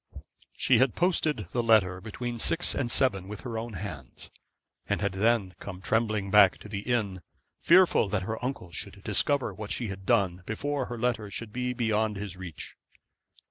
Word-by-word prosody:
She 125 -3 +4
had 130 -2 +3
posted 160 - +1
the 120 - 0
letter 100 -5 +3
between 120 +3 -5
six 165 +9 +1
and 130 -4 -1
seven 100 -8 +1
with 105 0 -7
her 120 -3 -5
own 115 0 -6
hands, 80 -9 -7 0.6
and - - 0
had 100 -1 0
then 100 -1 +1
come 95 -2 -7
trembling 110 0 0
back 100 -2 +7
to - - -9
the 100 -1 -4
inn, 105 -5 -1 0.4
fearful 175 - +5
that 95 -2 -1
her 110 +4 -4
uncle 125 -9 -4
should - - -6
discover 140 -7 +1
what 105 +2 -7
she 120 -4 -1
had 95 -1 -8
done 95 -6 +2
before 140 +4 -2
her 120 - -5
letter 115 -3 -1
should 105 +2 -5
be 125 0 -1
beyond 110 -3 0
his 100 -2 -5
reach. 90 -4 -8
110 Hz, 180 wpm, -28 LUFS, 95-120 Hz, 0.6 s, back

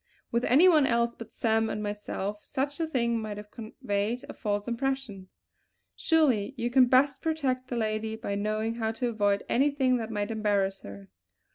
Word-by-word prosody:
With 235 +1 0
any 300 +9 +6
one 310 -6 +5
else 235 -1 +1
but 230 -1 -11
Sam 225 -1 +1
and 210 - -3
myself 205 0 -4
such 280 +2 -3
a 325 - 0
thing 235 -6 0
might 215 -2 -5
have 210 0 -10
conveyed 215 0 -3
a - - -7
false 205 0 -2
impression. 240 -6 -3 0.7
Surely 270 -9 +2
you 240 0 -2
can 255 0 +6
best 260 +2 +3
protect 270 -6 -1
the 245 - -3
lady 220 0 -2
by 200 - -4
knowing 215 +2 -1
how 225 -1 -2
to 240 +2 -2
avoid 205 -3 +1
anything 270 -1 +2
that 225 -2 -4
might 205 -1 -2
embarrass 200 -3 0
her!" 100 -1 -11
225 Hz, 175 wpm, -28 LUFS, 210-255 Hz, 0.7 s, any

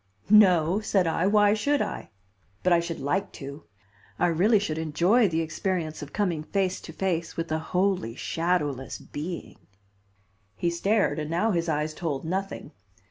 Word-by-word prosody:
"No," 185 -4 +6
said 200 -4 +1
I, 165 +2 +1
"why 205 0 +5
should 285 +7 +1
I? - - -4 0.5
But 180 - +4
I 170 - +5
should 170 0 -4
like 160 +9 -1
to. 140 +2 -9 0.5
I - - +2
really 195 +7 +4
should 160 -6 -2
enjoy 175 +9 +3
the 165 -2 0
experience 160 -1 -3
of 145 -1 -8
coming 180 -7 -1
face 185 +3 -1
to - - -9
face 170 -1 -2
with 165 -1 -3
a 160 - +1
wholly 180 - 0
shadowless 150 -5 -1
being." 165 +4 -7 1.0
He 170 +10 0
stared 195 -3 +1
and 150 0 -4
now 175 +7 +1
his 170 -2 0
eyes 155 0 -1
told 155 -3 -3
nothing. 190 +4 -4
170 Hz, 160 wpm, -26 LUFS, 155-195 Hz, 1.0 s, No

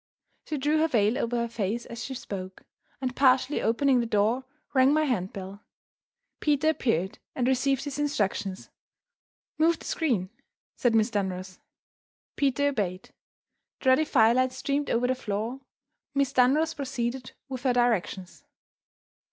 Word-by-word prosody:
She 305 - -2
drew 295 +3 +1
her 320 - +3
veil 220 -5 +2
over 235 +1 -1
her 235 0 0
face 230 0 -3
as 235 0 -7
she 265 - -5
spoke, 190 -6 -7 0.4
and, 255 -1 -2
partially 265 +1 +3
opening 255 +3 +3
the 235 - -1
door, 225 +5 +1 0.3
rang 265 +1 +5
my 310 - +3
handbell. 195 -5 -3 0.8
Peter 300 0 +2
appeared, 195 - 0 0.2
and 250 -1 0
received 270 +1 +1
his 285 0 -5
instructions. 205 -9 -2 0.9
"Move 325 +1 +4
the - - -13
screen," 220 - -1 0.4
said 245 -5 +2
Miss 220 +1 +3
Dunross. 185 -2 -3 0.8
Peter 285 0 +2
obeyed; 195 -8 -3 0.7
the 260 - +2
ruddy 260 +5 +5
firelight 255 -1 +3
streamed 280 +2 -2
over 235 +2 +1
the 255 - +2
floor. 235 +1 -4 0.5
Miss 280 -1 +1
Dunross 295 +6 +3
proceeded 255 -3 -4
with 260 -2 -6
her 255 -2 +2
directions. 225 -4 0
250 Hz, 140 wpm, -27 LUFS, 215-275 Hz, 0.9 s, rang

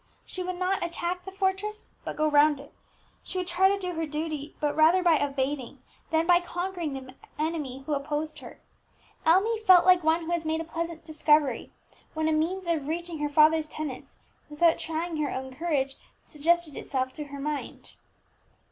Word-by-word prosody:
She 370 - -6
would 365 0 -3
not 370 +1 0
attack 345 +1 -2
the 385 - -7
fortress, 390 +2 -2
but - - -5
go 310 - +1
round 295 -1 +4
it; 280 - -13 0.5
she - - -6
would 365 - -1
try 360 +2 +3
to 400 - +1
do 365 -2 -4
her 325 -1 -2
duty, 300 -1 -4
but 295 -1 0
rather 325 +4 +5
by 345 -2 +5
evading 275 -1 -2 0.3
than 320 0 +2
by 350 0 +6
conquering 350 -3 -3
the 260 -1 -8 0.2
enemy 300 -4 -3
who 300 - -1
opposed 295 +2 -3
her. - - -12 0.7
Emmie 410 +7 +4
felt 370 -5 +6
like 365 -2 +6
one 320 +2 +2
who 330 - -4
has 340 -1 0
made 320 0 -1
a - - -2
pleasant 330 0 -5
discovery 300 -5 +2 0.4
when 315 0 0
a - - +2
means 340 +5 0
of 320 -5 -1
reaching 335 0 -4
her 295 0 -1
father's 310 +1 +4
tenants, 300 -4 -6 0.3
without 325 +2 +3
trying 325 +1 -3
her 300 -2 0
own 260 0 -5
courage, 275 -3 -1 0.3
suggested 330 0 0
itself 260 -1 -2
to 300 - -6
her 280 0 -8
mind. 295 0 -5
320 Hz, 185 wpm, -27 LUFS, 295-345 Hz, 0.7 s, by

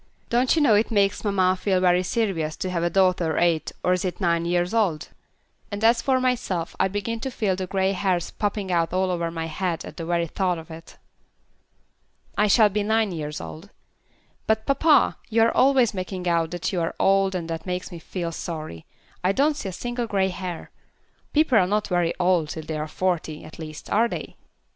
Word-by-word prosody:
Don't 245 +4 +3
you 315 - +3
know 245 -7 +5
it 210 +2 +3
makes 200 -3 +1
mamma 190 -3 +2
feel 190 0 +1
very 180 0 +3
serious 180 -6 -1
to 185 - -3
have 170 -2 -1
a 170 - +1
daughter 180 -3 +2
eight 170 -2 +1
or 180 - +3
is 180 - -1
it 185 -2 -3
nine 170 -3 +1
years 175 +2 0
old? 195 -9 0 0.6
And 205 +1 -5
as 230 +1 +5
for 260 -1 +2
myself, 245 -10 -1
I 190 - +3
begin 205 +4 -3
to 265 - -3
feel 210 -6 -1
the 185 0 -4
grey 190 +1 +1
hairs 185 -3 -1
popping 205 -2 -2
out 170 -1 +1
all 185 0 +1
over 170 -1 -1
my 165 -1 -4
head 165 +1 -3
at - - -10
the 165 - -5
very 170 -1 +1
thought 180 +1 -1
of 160 0 -10
it." 160 +1 -11 1.4
"I 210 - +3
shall 210 +1 +5
be 210 +1 -1
nine 220 0 +1
years 150 -3 -4
old. 165 +6 -9 0.8
But, 220 0 +1
papa, 290 +3 +3
you 225 0 +3
are 230 - +2
always 260 -4 +4
making 185 -1 -4
out 165 -2 +1
that 175 +3 -3
you 175 - 0
are 165 - -2
old 195 0 +3
and 170 -2 -3
that 165 +2 -5
makes 180 +2 -3
me 170 - -8
feel 170 +1 -4
sorry. 155 - -6 0.4
I 185 - +3
don't 290 +8 +2
see 210 -9 -4
a - - -5
single 240 +5 -4
grey 195 -3 +1
hair. 180 -2 -6 0.6
People 295 -7 +4
are 180 - +3
not 210 +2 0
very 175 -2 +1
old 175 -4 +2
till 160 +1 -5
they 155 0 -4
are 155 - -3
forty, 160 -2 -2
at 155 - -12
least, 155 -1 -8
are 225 +3 +4
they?" - - -6
185 Hz, 210 wpm, -24 LUFS, 170-210 Hz, 1.4 s, know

